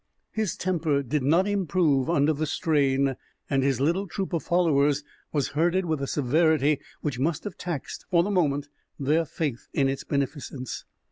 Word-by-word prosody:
His 220 Hz, -4 st, -2 dB
temper 160 Hz, -6 st, 0 dB
did 145 Hz, +3 st, -1 dB
not 165 Hz, +9 st, +3 dB
improve 170 Hz, -8 st, +2 dB
under 155 Hz, -2 st, +3 dB
the 155 Hz, +1 st, -2 dB
strain, 140 Hz, -4 st, +1 dB, 0.3 s
and 135 Hz, -1 st, +3 dB
his 135 Hz, -1 st, +1 dB
little 170 Hz, +8 st, +1 dB
troop 190 Hz, +1 st, -4 dB
of 165 Hz, -, +1 dB
followers 150 Hz, -5 st, +2 dB, 0.3 s
was 145 Hz, -4 st, 0 dB
herded 175 Hz, +5 st, +1 dB
with 155 Hz, -4 st, -1 dB
a 140 Hz, -, -2 dB
severity 150 Hz, +1 st, +2 dB, 0.2 s
which 145 Hz, -5 st, -2 dB
must 150 Hz, +3 st, 0 dB
have 205 Hz, -, -6 dB
taxed, 170 Hz, -7 st, -5 dB
for 170 Hz, -1 st, +4 dB
the 205 Hz, -, -1 dB
moment, 145 Hz, -6 st, +1 dB, 0.3 s
their 150 Hz, +4 st, +2 dB
faith 145 Hz, -6 st, -3 dB
in 140 Hz, -2 st, +2 dB
its 135 Hz, 0 st, -2 dB
beneficence. 140 Hz, -2 st, -3 dB
150 Hz, 165 wpm, -26 LUFS, 140-170 Hz, 0.3 s, for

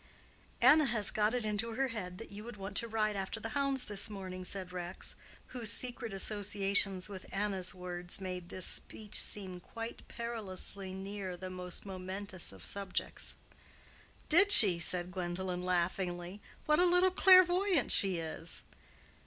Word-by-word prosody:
"Anna 305 Hz, 0 st, +6 dB
had 215 Hz, -4 st, +2 dB
got 215 Hz, +2 st, +1 dB
it 240 Hz, -3 st, -2 dB
into 215 Hz, +2 st, -2 dB
her 270 Hz, +1 st, 0 dB
head 180 Hz, -6 st, -6 dB
that 225 Hz, -, -11 dB
you 205 Hz, +1 st, -9 dB
would 235 Hz, -1 st, -10 dB
want 195 Hz, 0 st, -8 dB
to 230 Hz, -, 0 dB
ride 215 Hz, -2 st, -1 dB
after 195 Hz, +3 st, -4 dB
the 225 Hz, -, -6 dB
hounds 275 Hz, 0 st, -1 dB
this 205 Hz, +1 st, 0 dB
morning," 185 Hz, -3 st, -7 dB
said 185 Hz, 0 st, -2 dB
Rex, 180 Hz, 0 st, 0 dB, 0.3 s
whose 235 Hz, -3 st, 0 dB
secret 245 Hz, -2 st, +1 dB
associations 195 Hz, -1 st, 0 dB
with 195 Hz, -2 st, -10 dB
Anna's 195 Hz, -2 st, -2 dB
words 180 Hz, 0 st, -3 dB
made 180 Hz, -2 st, -6 dB
this 185 Hz, -, -2 dB
speech 210 Hz, -1 st, 0 dB
seem 190 Hz, -3 st, -4 dB
quite 230 Hz, +5 st, -9 dB
perilously 200 Hz, -4 st, -5 dB
near 190 Hz, -1 st, -6 dB
the 185 Hz, +1 st, -7 dB
most 180 Hz, 0 st, -4 dB
momentous 190 Hz, 0 st, -3 dB
of 95 Hz, -2 st, -10 dB
subjects. 200 Hz, -2 st, -2 dB, 0.9 s
"Did 395 Hz, +6 st, +6 dB
she?" 190 Hz, -, +10 dB
said 180 Hz, +1 st, -2 dB
Gwendolen, 180 Hz, 0 st, -4 dB
laughingly. 180 Hz, +1 st, -2 dB, 0.2 s
"What 300 Hz, +1 st, +2 dB
a 360 Hz, -, +5 dB
little 360 Hz, +1 st, +4 dB
clairvoyant 370 Hz, -3 st, +5 dB
she 190 Hz, -3 st, +5 dB
is!" 165 Hz, 0 st, -6 dB
195 Hz, 155 wpm, -32 LUFS, 185-225 Hz, 0.9 s, she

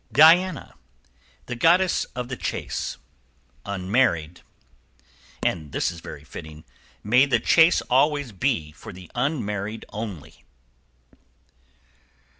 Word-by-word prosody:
= -, -, -40 dB
DIANA. 165 Hz, +2 st, +5 dB, 0.7 s
The 125 Hz, -, -5 dB
goddess 175 Hz, +7 st, +3 dB
of 125 Hz, -1 st, -4 dB
the 130 Hz, -, -4 dB
chase; -, -, -4 dB, 0.7 s
unmarried. 90 Hz, -4 st, 0 dB, 1.0 s
=And 80 Hz, -5 st, -2 dB
this -, -, 0 dB
is 85 Hz, -, -10 dB
very 75 Hz, -3 st, -10 dB
fitting. 80 Hz, 0 st, -10 dB, 0.4 s
May 125 Hz, +6 st, +4 dB
the 125 Hz, -4 st, +2 dB
chase 165 Hz, +8 st, +5 dB
always 145 Hz, 0 st, +1 dB
be 95 Hz, -, -1 dB
for -, -, -11 dB
the 90 Hz, -2 st, -13 dB
unmarried 110 Hz, -6 st, -2 dB
only! 105 Hz, -8 st, -8 dB
115 Hz, 105 wpm, -24 LUFS, 90-140 Hz, 1.0 s, DIANA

